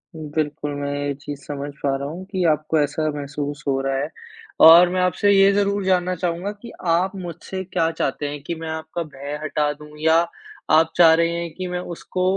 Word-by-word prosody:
बिल्कुल, 150 -1 -3
मैं 145 0 -3
ये 140 - -1
चीज़ 145 -1 -6
समझ 145 0 -5
पा 140 -1 +1
रहा 140 +1 -4
हूँ 175 +5 -7
कि 185 -2 -1
आपको 155 +1 0
ऐसा 155 +2 0
महसूस 145 0 -5
हो 135 -1 +1
रहा 135 0 -1
है 145 +3 -2 0.6
और 170 +2 +9
मैं 185 +1 0
आपसे 180 +3 +2
ये 195 0 +6
ज़रूर 200 0 +1
जानना 185 -1 +1
चाहूँगा 175 +3 -2
कि 235 - -9 0.2
आप 180 +4 +2
मुझसे 185 +1 -6
क्या 165 -3 0
चाहते 145 -2 -2
हैं 145 0 -6
कि 170 - -4
मैं 160 0 -6
आपका 160 +2 -4
भय 145 -1 -7
हटा 150 -1 0
दूँ 150 +1 -13
या 160 +1 +4 0.6
आप 160 +1 +4
चाह 165 -2 +8
रहे 165 +1 +3
हैं 170 -1 -5
कि 185 0 -4
मैं 180 0 -3 0.2
उसको 185 +2 -4
160 Hz, 205 wpm, -22 LUFS, 145-180 Hz, 0.6 s, और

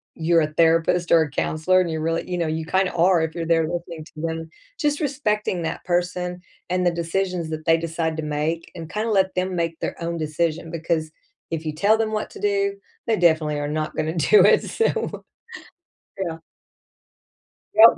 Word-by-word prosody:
you're 165 0 +3
a 155 0 -2
therapist 165 +1 +3
or 165 -1 +7
a 150 - -5
counselor 160 +6 +2
and 175 - -1
you 160 -1 -2
really 165 +2 -1
you 180 - -1
know, 170 - 0
you 160 0 -2
kind 185 +2 +1
of - - -10
are 175 -1 +5
if 160 0 -2
you're 165 -1 -3
there 165 -1 +3
listening 170 -2 -5
to - - -16 0.2
them. 160 0 -5 0.3
Just 295 -1 +1
respecting 210 - -1
that 160 - -4
person 180 0 -1 0.3
and 180 0 +1
the 175 - +4
decisions 170 0 -2
that 155 0 -5
they 165 0 +5
decide 165 -1 -2
to 160 - -3
make 150 +3 -2
and 165 -2 -7
kinda 220 +2 -1
let 190 -2 +2
them 185 0 -1
make 165 -1 -2
their - - -3
own 170 0 -2
decision 160 +1 -1
because 160 -1 -1 0.4
if 160 -1 -3
you 155 - -1
tell 205 +8 +3
them 220 -1 0
what 215 - -2
to 415 - -11
do, 400 -1 +1 0.3
they 225 - +3
definitely 155 -3 +3
are 145 - -2
not 155 0 -2
going 160 +2 -2
to - - 0
do 425 - +8
it, - - +5
so 455 0 -1 1.0
Yeah. 165 -1 -4 1.4
Yep. 225 +1 +8
170 Hz, 200 wpm, -23 LUFS, 160-185 Hz, 1.4 s, do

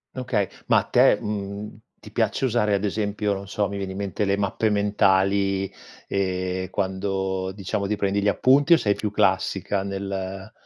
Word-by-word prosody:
Okay. 120 -6 -1 0.2
Ma - - +5
a - - -3
te, - - +4
mhmm, 100 0 -4 0.3
ti - - -12
piace 135 - 0
usare 110 -4 +2
ad 100 +1 0
esempio, 105 0 -1
non 100 0 -6
so, 100 0 -1
mi 100 - -5
viene 95 -1 -4
in - - -7
mente 100 0 -2
le 100 0 +2
mappe 100 +2 0
mentali, 100 -1 +2 0.4
ehm, 95 -1 -2
quando 95 -1 -2
diciamo 100 0 -3
ti 105 - 0
prendi 100 0 0
gli 105 - 0
appunti 140 - +4
o - - +7
sei 105 -7 +1
più 105 - -2
classica 95 0 +1
nel 95 0 -5
100 Hz, 175 wpm, -24 LUFS, 95-105 Hz, 0.4 s, o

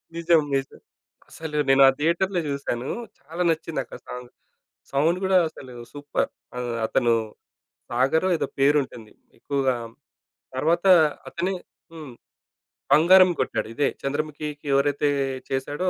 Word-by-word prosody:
నిజం. 170 -1 +3
నిజం. 135 0 -3 0.5
అసలు 160 -2 -6
నేను 135 0 +5
ఆ - - +8
థియేటర్‌లో 170 +3 +1
చూశాను 140 -3 -3 0.3
చాలా 165 +5 -4
నచ్చింది 165 0 -2
నాకు - - -6
ఆ - - -22
సాంగ్. 125 0 -8 0.6
సౌండ్ 160 +6 +2
గూడా 190 0 +4
అసలు 130 -5 -12 0.2
సూపర్! 145 0 -2 0.3
ఆ! - - -2 0.3
అతను 120 -1 +2 0.8
సాగరో 135 +9 +2
ఏదో - - -2
పేరు 145 +2 +4
ఉంటుంది 115 -4 -12 0.3
ఎక్కువగా 135 -2 0 0.8
తరువాత 170 +7 +1 0.4
అతనే 180 +3 -2 0.4
హ్మ్, 155 -6 -9 0.8
బంగారం 185 +4 +7
గొట్టాడు 130 -4 -1
ఇదే 145 - +2
చంద్రముఖికి 150 +1 -4
ఎవరైతే 145 +1 +2 0.4
చేశాడో 145 +7 -1
150 Hz, 120 wpm, -24 LUFS, 135-165 Hz, 0.8 s, ఆ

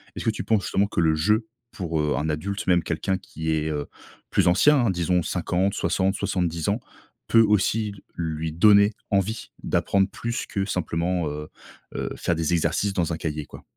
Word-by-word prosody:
Est-ce - - -6
que - - +3
tu - - -2
penses 110 -3 +1
justement 100 - +1
que 100 - -3
le 80 -2 +3
jeu 105 +8 +1 0.2
pour, 85 -4 -3
heu, 75 -1 +1
un 75 +2 -1
adulte, 100 +8 -3
même 90 -2 +4
quelqu'un 95 +3 -1
qui 80 -3 -6
est, 80 0 0
heu, 75 -2 -3 0.4
plus - - +2
ancien, 120 +12 +5
hein - - +2
disons 90 0 +1
50-60-70 95 -2 0
ans, 105 +3 +1 0.5
peut 115 - +6
aussi 105 0 +2 0.2
lui 80 -1 -3
donner 100 +5 +6 0.2
envie 100 +3 -1
d'apprendre 95 -1 +2
plus 120 +3 -4
que 100 - -2
simplement, 90 -2 -1
heu, 75 +1 -6 0.5
heu, - - -3
faire 85 - 0
des 80 +1 0
exercices 85 +4 +1
dans 85 -2 0
un 80 - -3
cahier 75 -2 -4
quoi? - - -13
90 Hz, 180 wpm, -24 LUFS, 80-100 Hz, 0.5 s, peut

